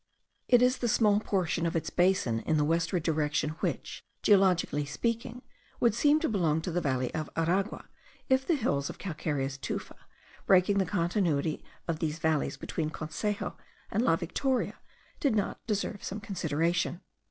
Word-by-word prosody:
It 245 Hz, 0 st, +6 dB
is 250 Hz, +1 st, +3 dB
the 240 Hz, -, 0 dB
small 210 Hz, -2 st, +4 dB
portion 175 Hz, -5 st, 0 dB
of 165 Hz, -, -3 dB
its 165 Hz, -, -1 dB
basin 175 Hz, -11 st, +2 dB
in 155 Hz, +6 st, 0 dB
the 150 Hz, -, +2 dB
westward 165 Hz, +2 st, +1 dB
direction 150 Hz, -1 st, 0 dB
which, -, -, -3 dB, 0.2 s
geologically 190 Hz, -7 st, +4 dB
speaking, 235 Hz, -, -3 dB, 0.4 s
would 235 Hz, -3 st, +4 dB
seem 290 Hz, +6 st, +4 dB
to 320 Hz, -, +1 dB
belong 165 Hz, -7 st, +1 dB
to 175 Hz, -, -4 dB
the 175 Hz, +2 st, 0 dB
valley 130 Hz, -4 st, -1 dB
of 155 Hz, -2 st, -3 dB
Aragua, 185 Hz, +6 st, 0 dB, 0.4 s
if 260 Hz, 0 st, +3 dB
the 335 Hz, -, +2 dB
hills 140 Hz, -, 0 dB
of -, -, -7 dB
calcareous 145 Hz, -6 st, -3 dB
tufa, -, -, -5 dB, 0.5 s
breaking 195 Hz, +1 st, +5 dB
the 190 Hz, -, +1 dB
continuity 170 Hz, -5 st, 0 dB, 0.2 s
of 165 Hz, -2 st, -1 dB
these 155 Hz, -1 st, -1 dB
valleys 160 Hz, -2 st, 0 dB
between 155 Hz, -2 st, -3 dB
Consejo 185 Hz, +7 st, -3 dB, 0.4 s
and 220 Hz, -, +1 dB
La 165 Hz, -, +4 dB
Victoria, 250 Hz, +10 st, -1 dB, 0.4 s
did 270 Hz, -6 st, +2 dB
not 205 Hz, -, -1 dB
deserve 205 Hz, -1 st, -2 dB
some 200 Hz, -, -4 dB
consideration. 170 Hz, -3 st, -1 dB
175 Hz, 160 wpm, -29 LUFS, 155-210 Hz, 0.5 s, It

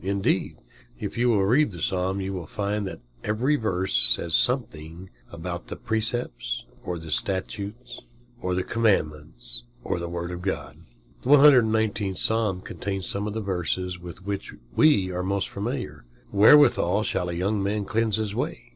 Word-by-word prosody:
Indeed, 100 Hz, -7 st, -1 dB, 0.4 s
if -, -, -5 dB
you 120 Hz, +1 st, +2 dB
will 100 Hz, -4 st, +3 dB
read 140 Hz, +9 st, +3 dB
the 90 Hz, -4 st, -9 dB
Psalm, 95 Hz, +3 st, 0 dB
you 95 Hz, +1 st, -3 dB
will 90 Hz, -4 st, -6 dB
find 100 Hz, +1 st, -2 dB
that -, -, -8 dB, 0.2 s
every 120 Hz, +8 st, +1 dB
verse 95 Hz, -7 st, -1 dB
says -, -, +5 dB
something 90 Hz, -, +1 dB, 0.2 s
about 85 Hz, +1 st, -6 dB
the -, -, -6 dB
precepts, 110 Hz, -, -2 dB, 0.2 s
or 90 Hz, -1 st, -4 dB
the 80 Hz, -1 st, -8 dB
statutes, 100 Hz, +7 st, -3 dB, 0.4 s
or 90 Hz, 0 st, -1 dB
the 90 Hz, -, 0 dB
commandments, 75 Hz, -, -1 dB, 0.2 s
or -, -, -2 dB
the 85 Hz, 0 st, -4 dB
word 85 Hz, 0 st, -4 dB
of 90 Hz, 0 st, -6 dB
God. 95 Hz, +1 st, -4 dB, 0.4 s
The 125 Hz, -, -5 dB
119th 110 Hz, -9 st, +5 dB
Psalm 110 Hz, -5 st, +1 dB
contains 95 Hz, 0 st, -4 dB
some 100 Hz, +1 st, -2 dB
of 105 Hz, -, -5 dB
the 110 Hz, -, -2 dB
verses 90 Hz, -1 st, -2 dB
with 90 Hz, +1 st, -10 dB
which 100 Hz, -1 st, -4 dB, 0.2 s
we 100 Hz, -12 st, +4 dB
are 90 Hz, 0 st, -2 dB
most 100 Hz, +1 st, -1 dB
familiar. 120 Hz, +6 st, -5 dB, 0.3 s
"Wherewithal 105 Hz, -3 st, +5 dB
shall 90 Hz, -4 st, -1 dB
a -, -, -3 dB
young 100 Hz, +4 st, -1 dB
man 100 Hz, +1 st, -1 dB
cleanse 110 Hz, 0 st, +1 dB
his 110 Hz, -2 st, -2 dB
way? -, -, -4 dB
100 Hz, 165 wpm, -25 LUFS, 90-110 Hz, 0.4 s, says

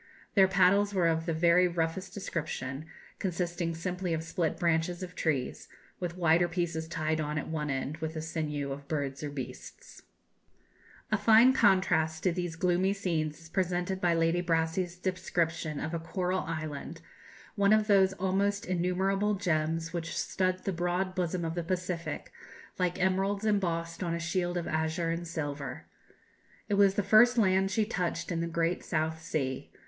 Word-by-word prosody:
Their 195 Hz, -2 st, +6 dB
paddles 195 Hz, +2 st, +3 dB
were 175 Hz, -3 st, +3 dB
of 165 Hz, +1 st, 0 dB
the 165 Hz, -, +1 dB
very 170 Hz, +2 st, +5 dB
roughest 170 Hz, +2 st, -2 dB
description, 155 Hz, -6 st, -4 dB, 0.3 s
consisting 175 Hz, -2 st, -2 dB
simply 180 Hz, 0 st, -2 dB
of 160 Hz, -, -4 dB
split 165 Hz, -1 st, -1 dB
branches 170 Hz, +1 st, 0 dB
of 180 Hz, 0 st, -7 dB
trees, 150 Hz, -8 st, -2 dB, 0.3 s
with 175 Hz, -1 st, -4 dB
wider 170 Hz, 0 st, +4 dB
pieces 165 Hz, -2 st, -2 dB
tied 155 Hz, -1 st, -1 dB
on 150 Hz, 0 st, -2 dB
at 145 Hz, -, -3 dB
one 150 Hz, -2 st, -2 dB
end 135 Hz, +2 st, -2 dB
with 160 Hz, 0 st, -4 dB
the 155 Hz, -, -3 dB
sinews 150 Hz, -3 st, -3 dB
of 140 Hz, +1 st, -7 dB
birds 140 Hz, -3 st, -2 dB
or 150 Hz, -, -2 dB
beasts." 140 Hz, -3 st, -8 dB, 1.1 s
A 215 Hz, -, +2 dB
fine 225 Hz, +5 st, +7 dB
contrast 185 Hz, -8 st, +3 dB
to 185 Hz, -, +3 dB
these 175 Hz, -1 st, -3 dB
gloomy 180 Hz, +3 st, +2 dB
scenes 165 Hz, -5 st, -2 dB
is 160 Hz, -, -14 dB
presented 185 Hz, +1 st, -1 dB
by 175 Hz, -1 st, +3 dB
Lady 165 Hz, +1 st, +2 dB
Brassey's 170 Hz, +1 st, 0 dB
description 170 Hz, -4 st, -1 dB
of 160 Hz, -, -4 dB
a 170 Hz, -, -1 dB
coral 180 Hz, +3 st, -1 dB
island, 155 Hz, 0 st, -5 dB, 0.5 s
one 200 Hz, -1 st, +3 dB
of 215 Hz, 0 st, +5 dB
those 195 Hz, -2 st, +4 dB
almost 195 Hz, +2 st, 0 dB
innumerable 190 Hz, +3 st, +1 dB
gems 165 Hz, -3 st, -1 dB
which 165 Hz, -1 st, -3 dB
stud 185 Hz, -1 st, 0 dB
the 195 Hz, -, 0 dB
broad 175 Hz, +2 st, -1 dB
bosom 180 Hz, -2 st, -1 dB
of 165 Hz, -, -2 dB
the 175 Hz, 0 st, -2 dB
Pacific, 180 Hz, -1 st, -3 dB, 0.5 s
like 180 Hz, 0 st, 0 dB
emeralds 195 Hz, +3 st, +1 dB
embossed 170 Hz, -5 st, 0 dB
on 170 Hz, -2 st, -1 dB
a -, -, -3 dB
shield 175 Hz, +1 st, -1 dB
of 170 Hz, -, -3 dB
azure 160 Hz, +1 st, 0 dB
and 170 Hz, +1 st, -3 dB
silver. 145 Hz, -4 st, -4 dB, 0.8 s
It -, -, -1 dB
was 200 Hz, -1 st, +5 dB
the 205 Hz, -, +1 dB
first 240 Hz, +5 st, +6 dB
land 190 Hz, -3 st, +3 dB
she 210 Hz, +2 st, +1 dB
touched 180 Hz, -4 st, -2 dB
in 165 Hz, -1 st, -1 dB
the 170 Hz, -, -1 dB
great 170 Hz, +1 st, 0 dB
South 160 Hz, 0 st, -1 dB
Sea. 140 Hz, -6 st, -3 dB
175 Hz, 165 wpm, -30 LUFS, 160-185 Hz, 1.1 s, fine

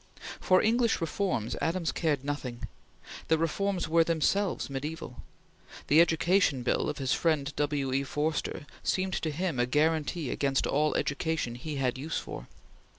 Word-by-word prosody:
For 185 Hz, 0 st, +4 dB
English 230 Hz, +1 st, +2 dB
reforms 165 Hz, -, -1 dB
Adams 165 Hz, 0 st, 0 dB
cared 150 Hz, -5 st, 0 dB
nothing. 130 Hz, -5 st, -4 dB, 0.6 s
The 160 Hz, -, +3 dB
reforms 180 Hz, +3 st, -1 dB
were 165 Hz, +1 st, +4 dB
themselves 170 Hz, +5 st, 0 dB
mediaeval. 140 Hz, -1 st, -6 dB, 0.7 s
The 155 Hz, +3 st, +7 dB
Education 165 Hz, -4 st, +2 dB
Bill 120 Hz, -, +1 dB
of -, -, -4 dB
his 135 Hz, -1 st, 0 dB
friend 150 Hz, -4 st, 0 dB
W. 145 Hz, -3 st, -1 dB
E. 135 Hz, +1 st, +1 dB
Forster 150 Hz, +1 st, -2 dB, 0.2 s
seemed 185 Hz, 0 st, 0 dB
to 160 Hz, -, -1 dB
him 160 Hz, -2 st, -2 dB
a 120 Hz, -, +2 dB
guaranty 155 Hz, +1 st, +1 dB
against 135 Hz, -1 st, +1 dB
all 150 Hz, +2 st, +1 dB
education 145 Hz, -3 st, -1 dB
he 145 Hz, +5 st, -6 dB
had 130 Hz, -2 st, -1 dB
use 155 Hz, +4 st, -3 dB
for. -, -, -6 dB
155 Hz, 150 wpm, -29 LUFS, 140-170 Hz, 0.7 s, The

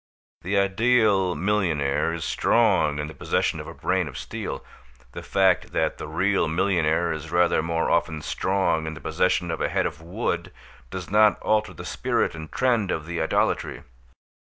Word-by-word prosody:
The 100 Hz, +2 st, -1 dB
ideal 100 Hz, -2 st, +3 dB
millionaire 80 Hz, -7 st, 0 dB
is 85 Hz, -1 st, -4 dB
strong 75 Hz, -2 st, +2 dB
in 75 Hz, -, -2 dB
the 80 Hz, -, -8 dB
possession 80 Hz, -, -1 dB
of 75 Hz, -, -7 dB
a 85 Hz, -, -8 dB
brain 95 Hz, -3 st, 0 dB
of 70 Hz, -, -8 dB
steel. -, -, -6 dB, 0.5 s
The -, -, -7 dB
fact 95 Hz, -2 st, +1 dB
that -, -, 0 dB
the -, -, -6 dB
real -, -, +1 dB
millionaire 85 Hz, -1 st, +1 dB
is 80 Hz, 0 st, -7 dB
rather 85 Hz, -1 st, +3 dB
more 80 Hz, +1 st, -1 dB
often 80 Hz, -3 st, 0 dB
strong 95 Hz, -4 st, 0 dB
in 80 Hz, -, -4 dB
the -, -, -9 dB
possession 85 Hz, +3 st, 0 dB
of 80 Hz, -, -4 dB
a -, -, +1 dB
head -, -, 0 dB
of 80 Hz, -, -4 dB
wood, 85 Hz, 0 st, -3 dB, 0.4 s
does 90 Hz, -2 st, -7 dB
not 105 Hz, -3 st, +5 dB
alter 110 Hz, 0 st, +1 dB
the -, -, -8 dB
spirit -, -, -1 dB
and 80 Hz, -1 st, -9 dB
trend 120 Hz, -6 st, +1 dB
of 80 Hz, -3 st, -2 dB
the 85 Hz, 0 st, -3 dB
idolatry. 80 Hz, -, 0 dB
85 Hz, 175 wpm, -24 LUFS, 80-95 Hz, 0.5 s, not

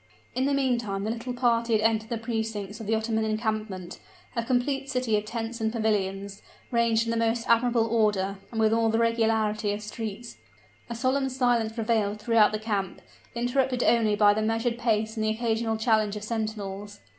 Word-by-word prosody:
In 255 Hz, +2 st, 0 dB
the 280 Hz, -, +1 dB
meantime 235 Hz, -7 st, 0 dB
the 215 Hz, -, -1 dB
little 235 Hz, +2 st, -4 dB
party 235 Hz, -1 st, +2 dB
had 215 Hz, -, +3 dB
entered 220 Hz, 0 st, +1 dB
the 235 Hz, -, -1 dB
precincts 220 Hz, -2 st, -4 dB
of 220 Hz, -, -7 dB
the 220 Hz, -, +2 dB
Ottoman 220 Hz, 0 st, 0 dB
encampment, 215 Hz, -4 st, -3 dB, 0.4 s
a 235 Hz, -, 0 dB
complete 270 Hz, +3 st, 0 dB
city 250 Hz, -5 st, 0 dB
of 210 Hz, 0 st, -1 dB
tents 230 Hz, +1 st, -4 dB
and 220 Hz, 0 st, +1 dB
pavilions, 200 Hz, -3 st, -1 dB, 0.3 s
ranged 230 Hz, -1 st, +2 dB
in 230 Hz, -, -1 dB
the 230 Hz, -, 0 dB
most 230 Hz, +1 st, -1 dB
admirable 235 Hz, 0 st, +3 dB
order, 205 Hz, -4 st, +1 dB
and 225 Hz, -, -4 dB
with 220 Hz, 0 st, +3 dB
all 225 Hz, 0 st, +3 dB
the 225 Hz, -, +1 dB
regularity 225 Hz, -2 st, +1 dB
of 210 Hz, +1 st, -5 dB
streets. 220 Hz, +1 st, -6 dB, 0.5 s
A 235 Hz, -, -4 dB
solemn 265 Hz, +3 st, +1 dB
silence 245 Hz, -4 st, +1 dB
prevailed 220 Hz, -2 st, 0 dB
throughout 215 Hz, -1 st, +4 dB
the 215 Hz, -, -1 dB
camp, 205 Hz, -4 st, -3 dB, 0.4 s
interrupted 250 Hz, +1 st, +1 dB
only 225 Hz, -3 st, +3 dB
by 205 Hz, 0 st, +5 dB
the 215 Hz, -, -1 dB
measured 225 Hz, +2 st, 0 dB
pace 220 Hz, -2 st, 0 dB
and 220 Hz, -, -1 dB
the 215 Hz, -, +1 dB
occasional 225 Hz, 0 st, 0 dB
challenge 220 Hz, -2 st, +2 dB
of 210 Hz, -, -6 dB
sentinels. 210 Hz, -2 st, -4 dB
225 Hz, 185 wpm, -27 LUFS, 215-235 Hz, 0.5 s, by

